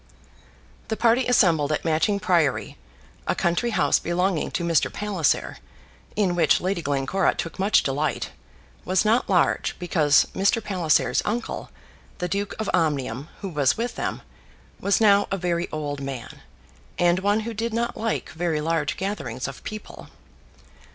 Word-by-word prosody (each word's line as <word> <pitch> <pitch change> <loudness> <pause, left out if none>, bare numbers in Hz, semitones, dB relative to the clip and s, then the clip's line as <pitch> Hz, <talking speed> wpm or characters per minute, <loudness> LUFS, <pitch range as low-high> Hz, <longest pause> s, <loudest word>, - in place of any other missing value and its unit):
The 220 - -2
party 240 +2 +3
assembled 165 -11 +3
at 150 - -1
Matching 165 +6 +1
Priory, 170 -7 +1 0.5
a - - +1
country 175 +8 0
house 145 -10 +2
belonging 175 0 0
to 170 - -3
Mr. 165 -3 +2
Palliser, 195 -8 0 0.6
in 200 -4 +2
which 170 -3 +3
Lady 185 -1 -1
Glencora 145 +6 0
took 165 - -5
much 195 +3 +3
delight, 145 +1 -1 0.5
was 185 +2 +1
not 230 +4 +2
large, - - +2
because 155 -5 +3
Mr. 195 +4 +2
Palliser's 160 - +1
uncle, 225 +2 -3 0.5
the 180 - -2
Duke 200 +2 -2
of 220 - -3
Omnium, 145 -4 0
who 195 - -4
was 145 -6 +1
with 235 +2 -2
them, - - -4 0.6
was 200 -1 +2
now 205 -2 +5
a 195 - -1
very 175 -1 -1
old 145 -2 -4
man, 135 -3 -7 0.6
and 175 +1 +3
one 205 +3 +1
who 230 +1 -5
did 230 +2 -2
not 235 +1 -1
like 225 -7 -2
very 160 0 -1
large 160 0 -1
gatherings 135 - -3
of 135 - -9
people. 215 -1 -8
175 Hz, 150 wpm, -24 LUFS, 150-205 Hz, 0.6 s, now